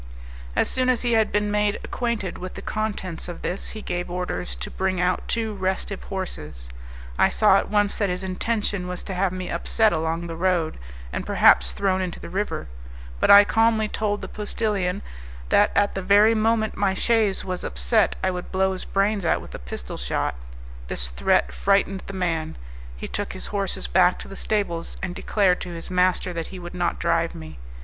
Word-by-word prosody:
As - - +2
soon 255 0 0
as 255 -1 +2
he 240 - +1
had 220 -1 +3
been 205 0 +1
made 210 0 +2
acquainted 235 -7 -3
with 185 0 -7
the - - -7
contents 205 -6 -3
of 175 - -8
this, 185 - -3
he 215 - -8
gave 175 0 -3
orders 180 - -3
to - - -6
bring 190 -1 -1
out 180 0 0
two 225 -2 -1
restive 190 0 -3
horses. 75 - -6 0.5
I - - +5
saw - - +5
at - - -4
once 205 -1 +2
that 200 -3 +1
his 180 +1 -3
intention 200 0 -1
was 180 -1 -5
to 195 - -5
have 185 0 +1
me 185 0 -5
upset 215 +5 +2
along 165 +1 -1
the 165 -1 -5
road, 175 -2 0 0.3
and - - -2
perhaps - - +5
thrown 190 -1 0
into 180 -2 -4
the - - -9
river; 185 -4 -2 0.5
but - - +2
I 200 0 +11
calmly 220 +1 +2
told 210 -1 -2
the - - -5
postillion 205 -3 -2 0.5
that 205 - +5
at 205 0 +3
the 195 - -3
very 205 +4 +5
moment 220 0 +1
my 195 -2 +1
chaise 220 -3 +1
was 185 -1 -4
upset - - +2
I 190 - +2
would 180 -1 -6
blow 190 0 +2
his 185 - -5
brains 200 0 +1
out 160 - +2
with - - -11
a - - -6
pistol 60 +1 -7
shot; 60 - -1 0.5
this 60 0 -1
threat - - +1
frightened 195 - +1
the 195 - -6
man; 165 -4 -2 0.4
he - - -6
took 205 0 -4
his 185 - -5
horses 200 -2 +1
back 180 0 +4
to - - -8
the 195 - -9
stables, 195 -6 -2
and 185 -2 -2
declared 185 -1 +1
to - - -5
his 165 +2 -7
master 180 0 +2
that 165 -1 -4
he 190 - -9
would 175 -1 -8
not 175 -1 -1
drive 170 0 0
me. 80 -4 -9
190 Hz, 200 wpm, -24 LUFS, 175-205 Hz, 0.5 s, I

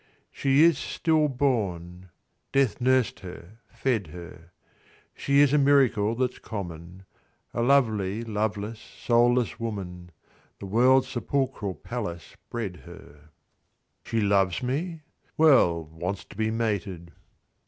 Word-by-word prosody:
She 140 +3 +3
was 165 -4 +3
still 155 -2 +1
born; 95 - -2 0.4
death 135 -3 +1
nursed 130 -1 +2
her, 95 +3 -11
fed 115 -5 -1
her; 85 0 -11 0.6
She 140 0 +2
is 145 -1 +4
a 150 - +5
miracle 130 -6 +3
that's 125 +1 -2
common, 90 -2 -8 0.5
A - - -1
lovely, 115 -5 +2
loveless, 110 0 -3
soulless 120 0 +1
woman: 95 -6 -6 0.5
The - - -9
world's 125 +6 +4
sepulchral 125 -6 -2
palace 85 -6 -6
bred 105 -7 -4
her. 75 +1 -15 0.7
She 115 - -1
loves 100 -1 +1
me 155 +6 -3 0.2
.' - - -40
Well, 125 - +5
wants 85 +5 -5
to - - -15
be 110 +1 0
mated. 100 -6 -3
110 Hz, 120 wpm, -26 LUFS, 95-130 Hz, 0.7 s, a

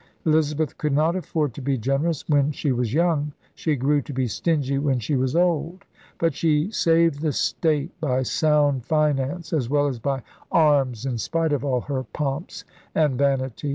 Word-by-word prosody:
Elizabeth 155 -2 +1
could 150 -2 0
not 155 +4 +2
afford 155 -7 -2
to 140 - -8
be 135 +1 0
generous 135 +6 -1
when 145 -1 +3
she 145 -1 -1
was 120 -3 -1
young. 150 -1 +1 0.2
She 155 -2 -1
grew 145 +3 +1
to 140 - -8
be 130 0 0
stingy 140 +2 0
when 140 -2 +1
she 125 +5 -2
was 130 +2 0
old. 175 +1 0 0.3
But 165 -2 +1
she 155 +5 +1
saved 165 -6 +2
the 155 -2 +1
state 155 +2 0
by 130 -4 +1
sound 145 -2 +2
finance 155 +3 0
as 130 -7 0
well 145 0 +2
as 135 -4 -2
by 135 +1 -2 0.3
arms 140 -7 +3
in 125 -3 -2
spite 165 +6 0
of 140 -2 -1
all 130 -3 0
her 135 0 -3
pomps 140 +4 -4 0.3
and 150 -4 +2
vanities. 135 0 0
145 Hz, 180 wpm, -23 LUFS, 135-160 Hz, 0.3 s, when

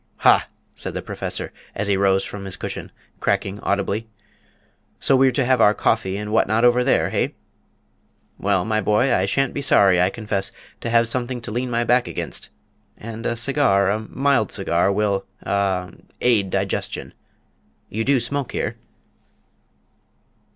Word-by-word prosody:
"Ha!" - - +5 0.3
said - - -5
the - - -2
Professor, - - -5 0.2
as 105 - -2
he 100 - +3
rose 95 0 +3
from 100 -1 -7
his 95 -1 -4
cushion, - - -6 0.3
cracking 100 +1 -1
audibly, 100 +3 -1 0.9
"so 135 - +3
we're 130 0 +5
to 130 +1 0
have 130 -2 +3
our 105 0 +5
coffee 95 -4 0
and 105 0 -5
what 110 - +3
not 110 +2 +2
over 120 +1 +4
there, 130 - +2
hey?... - - 0 1.0
Well, 95 -2 +1
my 110 -1 0
boy, 105 +6 +2
I 95 - +2
shan't 135 +5 +1
be 140 - -3
sorry, 95 -9 +4
I 90 - +4
confess, 100 -2 -2 0.3
to 115 - -4
have 115 0 +4
something 125 +1 -2
to 110 - -6
lean 125 +3 -2
my 120 0 +1
back 120 +1 +2
against - - -5 0.5
and 115 +1 -6
a 120 - 0
cigar, 115 -6 +2
a 105 - 0
mild 130 +1 0
cigar, 95 -1 +1
will 100 -1 0 0.2
ah 95 -3 0 0.3
aid 110 -6 +3
digestion. 95 +1 -2 0.8
You 110 +2 -2
do 135 +1 +3
smoke 135 +3 -3
here?" - - -2
110 Hz, 160 wpm, -22 LUFS, 100-120 Hz, 1.0 s, Ha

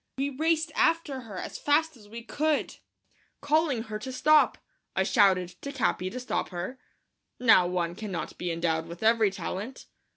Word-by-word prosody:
We 275 +1 -1
raced 315 +3 0
after 325 -5 +1
her 215 -6 -9
as - - -6
fast 315 +2 +2
as 210 -4 -17
we 230 +2 -8
could, 300 +4 -1 0.6
calling 290 -5 +1
to - - -16
her 215 0 -4
to 260 +4 -6
stop. 305 +4 +4 0.4
I - - +2
shouted 185 -3 +3
to 280 - -5
Capi 220 -8 0
to 250 - -6
stop 250 - -2
her. 185 +9 -5 0.6
Now 220 -7 +6
one 175 -1 -1
cannot 195 -2 -6
be 180 - -2
endowed 165 -1 -1
with 170 +4 -9
every 225 -1 +4
talent. 200 +6 -6
230 Hz, 170 wpm, -28 LUFS, 185-285 Hz, 0.6 s, Now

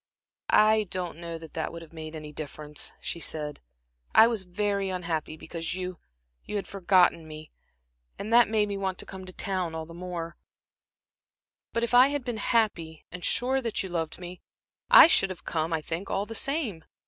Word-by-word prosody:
"I 215 0 +5
don't 180 -3 -4
know 170 -1 -5
that 160 -1 -12
that 160 - -3
would 170 0 -8
have 165 - -16
made 160 0 -7
any 150 -1 -8
difference," 150 0 -4
she 170 - -5
said. 150 -2 -3 0.6
"I 220 - +9
was 225 -5 -1
very 200 +1 -1
unhappy 165 -4 -3
because 165 +1 -4
you 185 -1 -5 0.5
had 205 -2 -3
forgotten 180 -4 +3
me, 155 0 -10 0.7
and 220 +3 -4
that 240 -1 +7
made 215 -1 +2
me 200 -1 -3
want 190 -1 -2
to - - -7
come 190 -1 -9
to - - -6
town, 185 -3 -2
all 160 0 -4
the 165 - -12
more; 170 -1 -6 1.3
but 230 - -1
if 235 - -1
I 250 +2 +8
had 285 -2 -3
been 240 -3 -2
happy, 200 -9 0
and 180 0 -8
sure 265 +2 +2
that 230 -5 -2
you 190 - -6
loved 165 -3 -3
me, 180 0 -9 0.5
I - - +11
should 195 -11 +4
have 185 - -8
come, 160 0 -1
I 160 -1 0
think, 165 +5 -5
all 195 +1 -1
the 225 - -8
same. 230 - 0
180 Hz, 190 wpm, -27 LUFS, 165-210 Hz, 1.3 s, I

